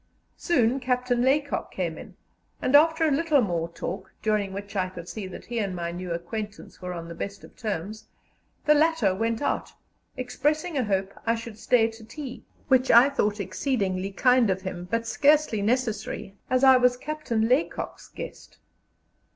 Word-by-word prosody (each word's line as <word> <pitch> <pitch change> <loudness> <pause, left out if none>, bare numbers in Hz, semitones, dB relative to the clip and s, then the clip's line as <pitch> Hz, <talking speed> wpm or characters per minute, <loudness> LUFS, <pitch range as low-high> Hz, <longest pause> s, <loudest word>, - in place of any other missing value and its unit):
Soon 260 -6 +2
Captain 250 -1 0
Laycock 280 +3 +1
came 170 -4 -2
in, - - -11 0.4
and 260 - +2
after 320 +2 +5
a - - +2
little 300 +1 +3
more 170 -4 -1
talk, 175 +3 -6
during 210 -3 +1
which 200 +2 -7
I 185 -1 0
could 175 -2 -9
see 190 +2 -5
that 185 - -9
he 235 -1 -3
and 195 -4 -2
my 170 -1 -3
new 180 0 -6
acquaintance 205 +6 -6
were 180 0 -4
on 170 -1 -6
the 170 - -7
best 200 +4 -6
of - - -14
terms, 215 0 -4 0.6
the 300 - +6
latter 305 - +3
went 225 +5 -1
out, - - -1 0.4
expressing 300 +7 -1
a 260 -4 +1
hope 195 -1 -1
I 230 - +3
should 230 -2 -8
stay 230 -1 +3
to 225 0 -13
tea, 265 +2 -8 0.2
which 260 0 +3
I 240 +4 +8
thought 210 -6 0
exceedingly 195 -1 -1
kind 250 +2 +4
of 190 0 -1
him, 180 -2 -5
but 230 +2 0
scarcely 290 -3 +3
necessary, 220 -3 -1
as 255 +1 +2
I 265 -1 +8
was 250 0 +3
Captain 250 -6 -1
Laycock's 260 +7 -1
guest. - - -9
225 Hz, 175 wpm, -26 LUFS, 190-260 Hz, 0.6 s, I